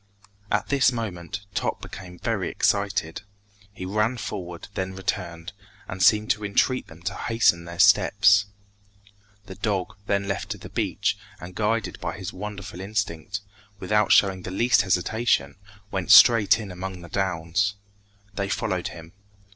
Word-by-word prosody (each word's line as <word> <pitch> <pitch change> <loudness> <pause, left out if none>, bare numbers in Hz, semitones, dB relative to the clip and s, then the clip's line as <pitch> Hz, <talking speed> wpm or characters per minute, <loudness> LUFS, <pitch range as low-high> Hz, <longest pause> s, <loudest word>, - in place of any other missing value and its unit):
At - - 0
this 140 -2 +4
moment, 105 -4 -5
Top - - -1
became 90 -2 -10
very - - -2
excited. 80 +1 0 0.5
He 95 -2 -8
ran 105 +6 0
forward, 90 -6 -6
then 95 -1 -3
returned, 85 -2 -4 0.3
and 90 0 -6
seemed 105 +2 +4
to 105 +1 -1
entreat 115 +5 +1
them 80 +1 -15
to - - -2
hasten 115 -7 +1
their 85 0 -8
steps. 100 +1 +5 1.0
The 95 - -9
dog 95 -2 -2
then 100 0 0
left 100 +1 -3
the - - -10
beach, - - -1 0.2
and 90 +1 -9
guided 110 +2 -1
by - - -4
his - - -6
wonderful 100 -3 -7
instinct, 100 -2 -3 0.4
without 105 +2 +1
showing 95 -2 +4
the 90 - -6
least 120 +6 +3
hesitation, 90 -6 +1 0.4
went 95 -2 -3
straight 115 -4 +8
in 105 -4 -7
among 90 0 -6
the 85 - -10
downs. 95 +1 0 0.6
They 100 0 -3
followed 95 -2 -1
him. 80 0 -10
100 Hz, 145 wpm, -25 LUFS, 90-105 Hz, 1.0 s, straight